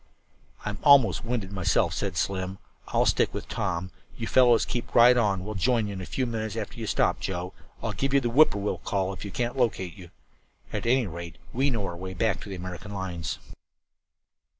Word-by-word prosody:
"I'm 105 -2 -3
almost 140 -5 +6
winded 115 -5 -3
myself," 95 -3 +1
said 95 -4 -3
Slim. 95 +1 -1 0.3
"I'll - - +2
stick - - +2
with - - -5
Tom; 95 -2 -2 0.3
you - - -3
fellows 120 -3 +5
keep 120 -1 -4
right 120 +1 +8
on. 100 -6 +1
We'll 105 - -4
join 115 +3 +2
you 100 - -4
in 95 - -5
a 95 - -7
few 130 - -1
minutes 110 -3 -3
after 115 +1 -5
you 110 - -4
stop. - - +1
Joe, 90 -1 -4 0.3
I'll - - -1
give 135 - -1
that 135 -3 +3
'whip 140 +7 +6
poor 100 - -4
will' 105 - -1
call 95 -1 -1
if - - -8
we 100 - -5
can't 120 +5 -2
locate 100 -8 0
you. 90 -4 -12 0.6
At - - -2
any 125 0 +3
rate, 85 -2 -7 0.2
we 135 +4 +2
know 115 -6 -1
our 90 - -4
way 95 +2 -6
back 110 +2 0
to - - -9
the 95 - -4
American 90 +3 -7
lines." 85 -5 -3
100 Hz, 205 wpm, -27 LUFS, 95-120 Hz, 0.6 s, right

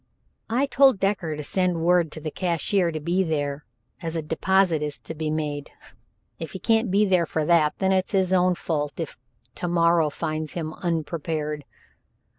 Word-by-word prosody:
"I 250 +5 +2
told 275 -5 +4
Decker 195 -5 0
to 150 - -5
send 180 +1 0
word 175 -3 +3
to - - -6
the 155 0 -5
cashier 175 +1 +1
to 155 - -4
be 175 +5 +1
there, 145 -3 -2 0.4
as 165 -1 -4
a 160 - -2
deposit 175 +1 +2
is 150 -1 -3
to - - -7
be 155 0 -3
made. 150 -2 -3 0.7
If - - -6
he - - -5
can't 225 -1 +2
be 200 +3 +3
there 180 -4 +2
for 155 -1 -1
that, 155 -2 +3
then 190 -1 +1
it's 190 +2 0
his 190 -1 +2
own 180 0 +3
fault 150 -3 -3
if 165 - -4 0.4
to 175 - -4
morrow 170 -2 +3
finds 155 +1 -4
him 160 -2 -4
unprepared." 155 -3 -3
165 Hz, 180 wpm, -25 LUFS, 155-185 Hz, 0.7 s, told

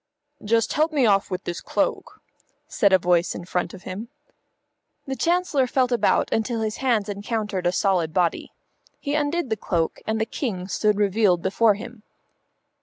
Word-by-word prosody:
"Just 225 +2 +1
help 310 +2 +2
me 285 -5 +2
off 200 -2 +3
with 185 -1 -4
this 175 - -5
cloak," - - -2 0.5
said 200 -4 +2
a 190 - +7
voice 175 -1 +1
in 175 - -7
front 180 -1 -2
of 190 - -14
him. 200 +5 -6 1.0
The 270 - -3
Chancellor 335 -5 +1
felt 255 0 +1
about 240 - +2
until 225 +1 -1
his 215 -1 -2
hands 235 -6 +1
encountered 205 -2 -2
a - - +3
solid 180 -4 +1
body. 175 0 0 0.5
He 285 - -3
undid 295 -2 -1
the 220 - +1
cloak 165 -4 -1
and 220 0 0
the 220 - +1
King 205 -7 -4
stood 210 +2 +1
revealed 200 -3 +2
before 210 +2 +3
him. 235 +1 -10
210 Hz, 170 wpm, -24 LUFS, 185-245 Hz, 1.0 s, a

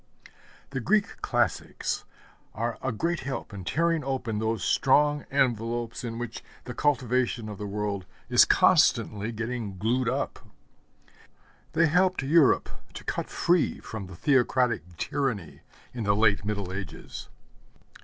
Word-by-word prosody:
The 135 - -2
Greek 205 - +1
classics - - -1 0.5
are 115 +1 -2
a 130 - -1
great 170 +9 -1
help 130 -4 -5
in 95 -2 -6
tearing 165 - +1
open 125 -5 -2
those 110 -2 -1
strong 145 +2 +3
envelopes 120 -3 0
in 115 -1 -4
which 120 -1 -6 0.2
the 125 - -6
cultivation 125 -4 +1
of 105 -2 -7
the 105 - -4
world 100 -2 -3 0.2
is - - +7
constantly 105 +2 +3
getting 110 -3 -4
glued 125 +5 +1
up. 135 +3 -2 1.3
They 165 +2 +4
helped 180 0 +2
Europe 150 +1 +4 0.3
to - - -7
cut - - -3
free 175 -1 +1
from 105 -4 -7
theocratic 120 - +1
tyranny 110 - -2 0.3
in 120 -2 -4
the 100 0 +3
late 105 -2 +3
Middle 100 -3 -2
Ages. 95 -1 -7
120 Hz, 130 wpm, -27 LUFS, 105-135 Hz, 1.3 s, is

